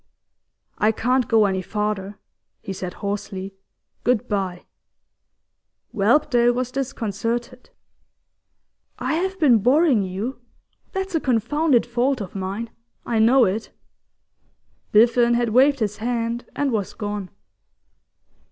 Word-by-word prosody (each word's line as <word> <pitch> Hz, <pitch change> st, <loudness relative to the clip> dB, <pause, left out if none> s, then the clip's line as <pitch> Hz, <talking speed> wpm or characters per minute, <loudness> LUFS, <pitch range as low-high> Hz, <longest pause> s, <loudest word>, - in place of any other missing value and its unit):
'I 215 Hz, +1 st, +3 dB
can't 250 Hz, +2 st, +1 dB
go 220 Hz, -2 st, +4 dB
any 190 Hz, -1 st, 0 dB
farther,' 210 Hz, 0 st, -3 dB, 0.5 s
he 195 Hz, -, -5 dB
said 185 Hz, -1 st, -6 dB
hoarsely. 195 Hz, -1 st, -4 dB, 0.5 s
'Good 245 Hz, -3 st, +1 dB
bye!' 190 Hz, -3 st, -3 dB, 1.3 s
Whelpdale 240 Hz, +2 st, +3 dB
was 250 Hz, 0 st, -2 dB
disconcerted. 240 Hz, -1 st, -3 dB, 1.3 s
'I -, -, -2 dB
have 380 Hz, +4 st, -2 dB
been 255 Hz, -8 st, +5 dB
boring 260 Hz, -, +4 dB
you. 195 Hz, +8 st, -4 dB, 0.5 s
That's 385 Hz, 0 st, -3 dB
a 325 Hz, -, +2 dB
confounded 260 Hz, +2 st, +2 dB
fault 245 Hz, +3 st, 0 dB
of 195 Hz, -4 st, -6 dB
mine; 200 Hz, +4 st, -4 dB, 0.3 s
I 230 Hz, -2 st, 0 dB
know 240 Hz, +3 st, +5 dB
it.' 205 Hz, +4 st, -2 dB, 1.2 s
Biffen 235 Hz, +2 st, +5 dB
had 240 Hz, -1 st, +1 dB
waved 265 Hz, +3 st, +4 dB
his 210 Hz, -1 st, -1 dB
hand, 235 Hz, +1 st, -2 dB
and 285 Hz, -2 st, 0 dB
was 210 Hz, -4 st, -2 dB
gone. 205 Hz, -3 st, -4 dB
230 Hz, 115 wpm, -22 LUFS, 205-255 Hz, 1.3 s, been